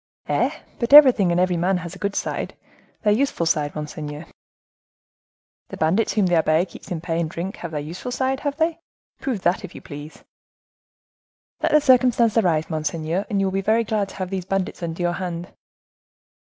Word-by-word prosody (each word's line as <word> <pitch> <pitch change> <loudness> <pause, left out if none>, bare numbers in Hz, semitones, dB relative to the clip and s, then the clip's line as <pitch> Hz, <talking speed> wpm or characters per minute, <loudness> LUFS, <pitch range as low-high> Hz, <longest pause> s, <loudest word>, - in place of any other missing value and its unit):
"Eh! - - +2 0.3
but 235 +3 -1
everything 255 -11 +8
and 170 - +2
every 180 -1 +2
man 180 +3 +1
has 170 -1 -7
a - - -13
good 200 -1 -2
side—their 210 -1 -3
useful 240 -7 0
side, 150 -2 0
monseigneur." 150 0 -6 1.4
"The - - -7
bandits 180 +8 +1
whom 205 -2 +2
the 175 - +1
abbe 160 +2 +3
keeps 195 - -13
in 170 -4 -3
pay 165 -1 -2
and 160 - -2
drink 175 +5 -5
have 170 - -6
their 150 -2 -4
useful 170 +11 -6
side, 265 +1 0
have 285 0 -3
they? 325 +1 0 0.4
Prove 250 -9 -3
that, 175 +2 +1
if - - -9
you - - -9
please." 145 +1 -10 1.4
"Let - - +1
the 300 - +6
circumstance 250 -4 +4
arise, 170 -8 +2
monseigneur, 160 +3 -2
and 205 -3 0
you 195 - +2
will 190 - 0
be 195 - 0
very 220 +4 +2
glad 210 -3 -1
to - - -12
have 185 -1 -4
these 190 -2 -3
bandits 195 -1 -2
under 170 +1 -3
your 175 0 +1
hand." 175 -1 -5
185 Hz, 190 wpm, -22 LUFS, 165-220 Hz, 1.4 s, everything